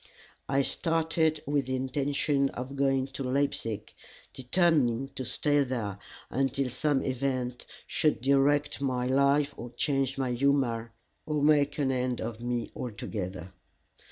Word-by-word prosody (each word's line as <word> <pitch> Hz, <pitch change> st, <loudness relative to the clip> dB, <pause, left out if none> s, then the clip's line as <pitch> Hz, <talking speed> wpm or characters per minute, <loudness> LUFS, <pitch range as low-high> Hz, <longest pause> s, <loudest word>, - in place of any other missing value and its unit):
I 135 Hz, 0 st, +3 dB
started 160 Hz, -1 st, +1 dB
with 145 Hz, -2 st, 0 dB
the 130 Hz, -, -1 dB
intention 140 Hz, +1 st, 0 dB
of 130 Hz, +3 st, -5 dB
going 135 Hz, -1 st, +2 dB
to 135 Hz, +1 st, -7 dB
Leipzig, 125 Hz, -5 st, -1 dB, 0.4 s
determined 135 Hz, -3 st, +1 dB
to 130 Hz, -, -3 dB
stay 145 Hz, +3 st, +2 dB
there 115 Hz, -7 st, -3 dB, 0.3 s
until 135 Hz, 0 st, 0 dB
some 140 Hz, +2 st, +1 dB
event 130 Hz, -2 st, -2 dB, 0.2 s
should 155 Hz, -, +1 dB
direct 140 Hz, +3 st, +2 dB
my 130 Hz, -2 st, 0 dB
life 140 Hz, +2 st, +3 dB
or 120 Hz, -, -7 dB
change 135 Hz, +2 st, 0 dB
my 130 Hz, -2 st, 0 dB
humor, 120 Hz, -3 st, +1 dB, 0.4 s
or 150 Hz, -2 st, 0 dB
make 145 Hz, -1 st, +4 dB
an 140 Hz, -3 st, +1 dB
end 125 Hz, -1 st, -1 dB
of 115 Hz, 0 st, -5 dB
me 120 Hz, -1 st, -2 dB
altogether. 95 Hz, -5 st, -5 dB
135 Hz, 130 wpm, -29 LUFS, 125-145 Hz, 0.4 s, make